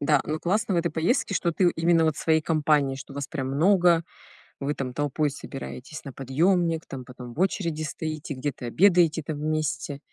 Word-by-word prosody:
Да, 145 -1 +3
но 155 +1 -2
классно 205 +2 0
в - - +1
этой 170 -1 0
поездке, 200 - 0
что 170 -2 +1
ты, 180 +2 +3
э, - - +2
именно 165 0 +3
вот 155 -2 +1
своей 160 -1 +2
компанией, 150 -4 +2
что 135 0 -10
вас 140 -1 -4
прям 135 -4 -3
много, 170 +2 +4 0.6
и - - -6
вы 145 +2 0
там 130 -3 -4
толпой 145 +1 0
собираетесь 140 +1 -8
на 135 - -7
подъемник, 165 +5 +1
там 130 -2 -7
потом 125 -1 -10
в 145 - -9
очереди 170 -4 0
стоите, 155 0 -4
где-то 135 -2 -4
обедаете 170 +2 +4
там 150 0 -4
вместе, 155 -2 -2
155 Hz, 195 wpm, -26 LUFS, 140-170 Hz, 0.6 s, много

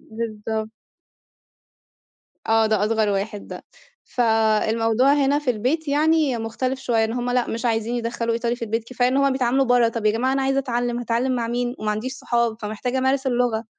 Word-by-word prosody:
بالضبط. 220 -1 -4 1.8
آه، 225 0 +3
ده 215 -2 +1
أصغر 220 -1 +1
واحد 205 +1 -3
ده. - - -9 0.4
فالموضوع 225 +2 +2
هنا 285 0 +2
في 295 -4 -1
البيت 260 +8 -1
يعني 300 -2 +2
مختلف 255 +4 -3
شويّة، 230 -4 +1
إن 225 - -2
هم 245 0 -2
لأ 245 -1 +1
مش 230 +2 -4
عايزين 225 0 0
يدّخلوا 230 -1 -2
إيطالي 235 +1 -1
في 235 - -4
البيت، 225 +1 -2
كفاية 250 +1 0
إن 260 - 0
هم 275 -1 +3
بيتعاملوا 260 +1 +1
برّه. 245 -2 +4
طَب 225 -2 -3
يا - - +5
جماعة 255 +4 0
أنا 270 0 0
عايزة 270 0 +1
أتعلم، 245 -2 -1
هاتعلم 245 +2 0
مع 230 -1 -1
مين 245 +1 -2
وما 215 0 -2
عنديش 225 +5 -3
صحاب 235 -3 0
فمحتاجة 220 +5 -3
أمارس 265 +1 +1
اللغة؟ 240 -3 0
235 Hz, 185 wpm, -22 LUFS, 225-255 Hz, 1.8 s, يا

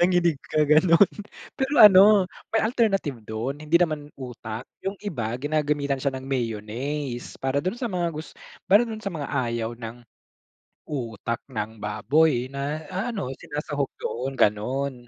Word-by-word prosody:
Nanginig 175 -3 +3
ka 155 - -3
gano'n. 165 +5 +5 0.5
Pero 265 +1 0
ano 200 0 +8 0.3
may 225 - +3
alternative 195 - +1
dun 115 +7 -4
hindi 155 +2 +3
naman 155 -4 0
utak. 120 -2 -7 0.2
Yung 195 +1 -2
iba 120 - -3
ginagamitan 145 -1 0
siya 135 0 -1
ng 130 0 -6
mayonnaise 120 +2 -3
para 135 +1 0
dun 185 +9 -2
sa 240 -1 -3
mga 175 -2 0
gus 155 +1 -7 0.4
para 205 +4 +7
dun 220 -1 -6
sa 195 - -3
mga 150 -3 -4
ayaw 120 -3 -1
ng 115 0 -7 0.9
utak 115 -5 -4
ng 110 -3 -5
baboy 130 +5 +1
na 145 +3 -3
ano, 195 - -3
sinasahog 145 -1 -3
doon, 130 +3 -3
gano'n. 130 +6 +1
145 Hz, 145 wpm, -25 LUFS, 120-175 Hz, 0.9 s, ano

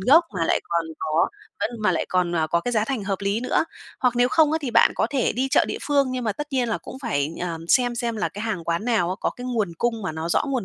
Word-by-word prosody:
gốc 290 - +6
mà 170 -3 0
lại - - +2
còn 170 -1 -1
có 160 +1 +1 0.3
vẫn - - 0
mà 185 - +3
lại 165 - -1
còn, 180 -2 +1
à, 160 -1 +2
có 170 +2 +1
cái 245 - -3
giá 215 -2 +2
thành 235 -4 -3
hợp 195 -1 -1
lý 200 +2 0
nữa. 255 - +1 0.4
Hoặc 250 -2 +2
nếu 245 0 +4
không 310 +2 +4
á 320 - +2
thì 260 - -2
bạn 230 0 +5
có - - +1
thể 270 -3 +1
đi 260 +2 -1
chợ - - +4
địa - - -4
phương, 285 -2 +2
nhưng 255 -1 -3
mà 215 - +1
tất 295 +8 -5
nhiên 255 -3 +1
là 225 - -1
cũng - - -9
phải, 150 - 0
ờ, 170 -2 -3
xem 245 +2 +3
xem 235 -1 -2
là 210 - 0
cái 205 - -7
hàng 210 -7 -3
quán 170 +5 -1
nào 225 -8 +2
á, - - -1
có - - 0
cái 245 - -9
nguồn 225 -8 -1
cung 230 -2 0
mà 170 -5 -2
nó 160 +1 -4
rõ - - +2
nguồn 260 -6 -1
225 Hz, 300 wpm, -24 LUFS, 175-250 Hz, 0.4 s, gốc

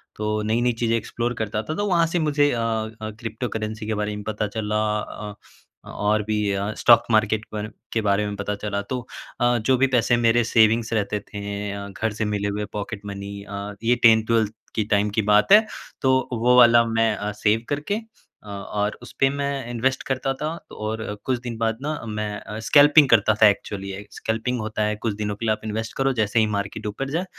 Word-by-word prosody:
तो 105 0 -1
नई-नई 120 +3 +1
चीज़ें 115 -1 +1
एक्सप्लोर 120 +2 -3
करता 105 0 -2
था। 155 - -4
तो 205 - -1
वहाँ 170 -3 +3
से 175 +1 -1
मुझे 145 -2 +2
अ 120 - -1
अ, 110 -1 -3
क्रिप्टोकरेंसी 110 -2 -4
के 110 - -1
बारे 105 0 -2
में 105 - -7
पता 105 -1 -2
चला। 105 0 -1 0.2
अ 105 -1 -7 0.5
अ, - - -11
और 105 +1 0
भी 105 -1 0
अ, 100 +2 -1
स्टॉक 120 -1 +6
मार्केट 110 0 +2
के - - -49
बारे 105 +1 -4 0.2
के 110 - +1
बारे 105 0 +1
में 100 - -4
पता 100 +1 -3
चला 100 0 -3
तो 125 - -1 0.4
अ, 120 0 +3
जो 125 +4 +2
भी 135 +1 +3
पैसे 120 -1 +2
मेरे 120 0 +3
सेविंग 115 0 +4
रहते 105 -1 0
थे। 100 0 -5
अ, 100 0 -6
घर 110 +2 -3
से 110 +1 -2
मिले 105 -1 -1
हुए 105 +1 -2
पॉकेट 105 0 -5
मनी 100 0 -6
अ, 100 0 -6
ये 120 +2 +3
10th-12th 110 -1 +4 0.2
की 110 - +1
टाइम 105 -1 +2
की - - +5
बात 105 - +4
है। 215 +1 +8 0.4
तो 130 -1 +2
वो 120 +2 +3
वाला 120 -1 +7
मैं 115 -1 +1
अ, 105 +1 -3
सेव 105 +2 +1
करके 145 +8 -1 0.5
अ, - - -15
और 105 +1 -3
उसपे 135 +2 0
मैं 140 -3 -3
इन्वेस्ट 130 +3 -1
करता 135 0 -1
था 155 - 0 0.2
और 110 +1 -4 0.2
कुछ 130 -2 0
दिन 120 -2 -6
बाद 115 0 0
ना 150 +1 -3
मैं 105 -1 -3
अ, 105 +1 -7
स्कैल्पिंग 145 -1 +7
करता 110 -1 +5
था 105 - +9
एक्चुअली। 100 -1 -1
ये 100 +2 -7
स्कल्पिंग 115 +2 -2
होता 110 0 -2
है, 105 0 0
कुछ 110 0 -2
दिनों 105 -1 -3
के 115 - -5
लिए 110 - +2
आप - - -7
इन्वेस्ट 110 +1 -3
करो 135 0 +2
जैसे 110 +2 +2
ही 110 - +4
मार्केट 100 +1 -4
ऊपर 135 +7 -4
जाए, 170 +5 -1
110 Hz, 210 wpm, -23 LUFS, 105-120 Hz, 0.5 s, था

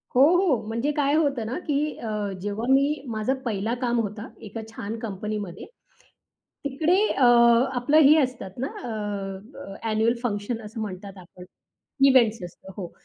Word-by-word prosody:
हो, 250 - +6 0.2
हो, 330 - +2
म्हणजे 230 +6 -1
काय 285 0 +2
होतं 280 -7 +1
ना 240 - -3
की 285 -1 +1 0.2
अ, 225 - -6 0.3
जेव्हा 205 +3 -3
मी 280 +1 +2
माझा 220 +4 0
पहिला 220 0 -1
काम 240 -1 +1
होता, 210 +1 -4 0.2
एका 225 +3 -6
छान 225 0 -6
कंपनीमध्ये. 205 -3 -5 1.0
तिकडे 310 +6 +2 0.2
अ, 270 - +3 0.5
आपलं 250 +5 +2
हे 300 - +7
असतात 240 -8 -4
ना 265 - -1 0.2
अ, 245 - -5 0.7
अ, 195 -8 -9 0.2
एन्युअल 220 +2 +2
फंक्शन 225 0 -2
असं 220 +1 -7
म्हणतात 195 -1 -7
आपण. 180 0 -13 0.6
इव्हेंट्स 235 -4 +4
असतं, 185 +2 -12
हो. 180 -4 -6
225 Hz, 150 wpm, -25 LUFS, 205-265 Hz, 1.0 s, हे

